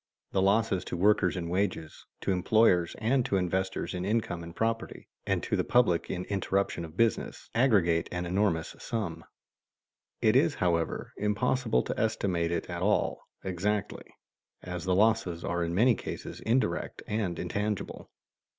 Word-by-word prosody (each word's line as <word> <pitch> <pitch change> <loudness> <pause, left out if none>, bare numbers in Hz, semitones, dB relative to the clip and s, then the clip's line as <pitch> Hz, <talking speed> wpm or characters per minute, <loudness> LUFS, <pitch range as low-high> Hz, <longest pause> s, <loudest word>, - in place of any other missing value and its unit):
_ - - -51
The 95 - +1
losses 100 0 +2
to - - -4
workers 100 -1 +3
in 85 -1 -3
wages, 90 -3 -2
to - - 0
employers 90 -2 +3
and 125 +4 +2
to 100 - -1
investors 95 +2 -1
in 90 -1 -3
income 105 -4 -1
and 85 0 -9
property, 115 0 -2 0.2
and - - 0
to - - 0
the - - +1
public 105 -10 +2
in 90 -1 -3
interruption 100 -3 -1
of 80 +1 -10
business, 115 -2 0
aggregate 100 -9 +3
an 90 0 -3
enormous 90 -2 0
sum. 85 -8 -4 1.0
It - - +3
is, - - +4
however, 85 -2 -1
impossible 110 +3 +1
to - - -4
estimate 95 -6 0
it 85 - -2
at 85 -1 -5
all 105 +3 +1 0.2
exactly, 95 +3 -2 0.6
as 90 -2 -5
the 95 -1 +2
losses 95 -5 +2
are 85 0 -1
in 85 0 -2
many 120 +6 +5
cases - - -6
indirect 110 -9 -1
and 105 -5 -1
intangible. 100 +3 -3
95 Hz, 155 wpm, -29 LUFS, 85-110 Hz, 1.0 s, many